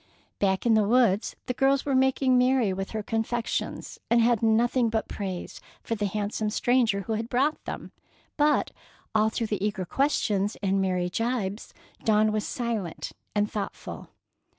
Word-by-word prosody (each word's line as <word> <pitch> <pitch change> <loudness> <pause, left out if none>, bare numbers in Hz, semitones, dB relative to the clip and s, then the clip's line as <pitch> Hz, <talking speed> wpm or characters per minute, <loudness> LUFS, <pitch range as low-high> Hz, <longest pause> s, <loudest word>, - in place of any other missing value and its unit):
Back 190 +1 +1
in 235 - +5
the 215 -1 +4
woods, 230 -3 +3
the 250 - -2
girls 270 +2 +2
were 280 - 0
making 265 0 +3
merry 250 -5 +3
with 195 +1 -4
her 220 -1 -4
confections, 225 +2 -2
and 235 - +4
had 235 -1 +3
nothing 230 +2 +3
but 220 0 -1
praise 190 -3 -5 0.2
for - - -2
the 205 -2 -1
handsome 210 +1 -2
stranger 230 -2 +2
who 220 +3 -3
had 225 +2 -3
brought 275 +5 +1
them; - - -6 0.4
but 295 0 +2 0.4
all 215 0 +3
through 230 +1 -2
the 210 -3 -2
eager 205 -3 -1
questions 210 - 0
and 195 0 +2
merry 180 -2 0
jibes 225 -1 -2 0.3
Dawn 215 -1 +3
was 215 0 -1
silent 225 -8 -3 0.2
and 210 0 +1
thoughtful. 205 -2 -6
220 Hz, 160 wpm, -27 LUFS, 205-245 Hz, 0.4 s, in